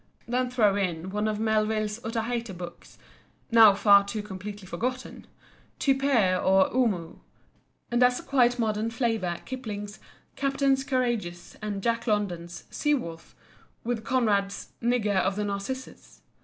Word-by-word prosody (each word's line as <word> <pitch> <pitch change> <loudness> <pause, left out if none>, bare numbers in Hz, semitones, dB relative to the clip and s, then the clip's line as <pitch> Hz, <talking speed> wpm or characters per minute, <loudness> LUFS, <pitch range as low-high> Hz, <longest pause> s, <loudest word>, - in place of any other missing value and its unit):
Then 250 +1 0
throw 215 -5 +3
in 180 -2 -2
one 210 +2 -1
of 215 -1 -1
Melville's 215 0 0
Otaheite 230 -2 -3
books—now 200 +4 +1
far 200 0 +6
too 205 +1 -4
completely 205 0 -8
forgotten—"Typee" 255 -2 -1
or 190 0 +4
"Omoo," 205 -10 0 0.7
and 240 +1 +1
as 250 0 +4
a - - -10
quite 245 -3 +3
modern 220 -1 0
flavour 225 -7 -1
Kipling's 215 -5 -6 0.4
"Captains 275 -1 +1
Courageous" 240 -10 -2
and 205 -2 -4
Jack 230 +1 0
London's 175 -5 -2
"Sea 295 -1 +1
Wolf," 165 -11 -7 0.5
with 235 -1 -2
Conrad's 205 -6 0
"Nigger 230 -4 +1
of 190 +1 +1
the 210 0 -1
Narcissus." 205 +6 -6
215 Hz, 125 wpm, -27 LUFS, 200-245 Hz, 0.7 s, far